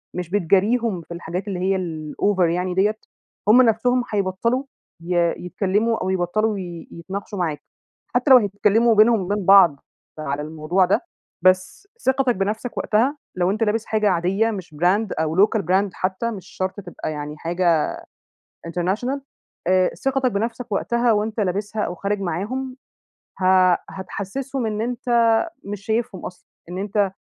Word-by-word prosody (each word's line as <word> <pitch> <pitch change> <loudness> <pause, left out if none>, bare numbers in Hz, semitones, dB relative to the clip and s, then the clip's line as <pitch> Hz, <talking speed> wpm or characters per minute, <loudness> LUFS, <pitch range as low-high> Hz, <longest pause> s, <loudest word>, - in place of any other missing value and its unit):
مش 180 -2 -4
بتجاريهم 205 +2 +1
في 170 - -10
الحاجات 175 +4 -5
اللي 190 -3 -3
هي 190 +1 +1
الOver 175 +2 0
يعني 180 +1 -1
دِيَّة، 205 +4 +2 0.5
هُم 250 +4 +8
نفسهم 245 +2 +2
هيبطلوا 205 +6 0 0.4
ي 175 +1 -3 0.3
يتكلموا 205 +5 0
أو - - -2
يبطلوا 195 +4 0
ي 175 -3 -7
يتناقشوا 195 +3 -6
معاك، 160 -4 -2 0.5
حتّى 250 +3 +3
لو 255 - +11
هيتكلموا 210 +2 +3
بينهم 220 +1 +5
وبين 200 +1 -2
بعض 180 -7 +7 0.4
على 145 -1 -3
الموضوع 160 +4 0
ده، 190 - +2 0.4
بس 185 - +2 0.2
ثقتك 265 -2 +2
بنفسك 215 +5 -3
وقتها، 250 +8 +1 0.2
لو 180 +1 +1
أنت 215 +3 0
لابس 220 +1 0
حاجة 215 -1 +1
عاديّة 190 +5 +1
مش 185 -7 -7
brand 185 +8 +2
أو 160 +5 +4
local 220 - -2
brand 190 +2 +1
حتّى، 190 +5 -2
مش 190 -3 -8
شرط 185 +2 -4
تبقى 175 -3 -6
يعني 150 0 -6
حاجة 170 -1 +1 0.8
international 195 - -1 0.5
آآ 185 0 +4 0.2
ثقتك 265 -2 +1
بنفسك 230 +3 -3
وقتها 235 +3 +1
وأنت 215 +1 -1
لابسها 205 +2 -1
أو 175 - -3
خارج 200 +3 -2
معاهم، 245 +9 -3 0.7
ه - - +1 0.5
هتحسسهم 230 +7 -4
إن 210 0 -2
أنت 245 +1 -4 0.6
مش 200 0 -6
شايفهم 220 -3 -2
أصلًا، 180 - -10 0.2
إن 180 - -5
أنت 200 -1 0
200 Hz, 145 wpm, -22 LUFS, 180-225 Hz, 0.8 s, لو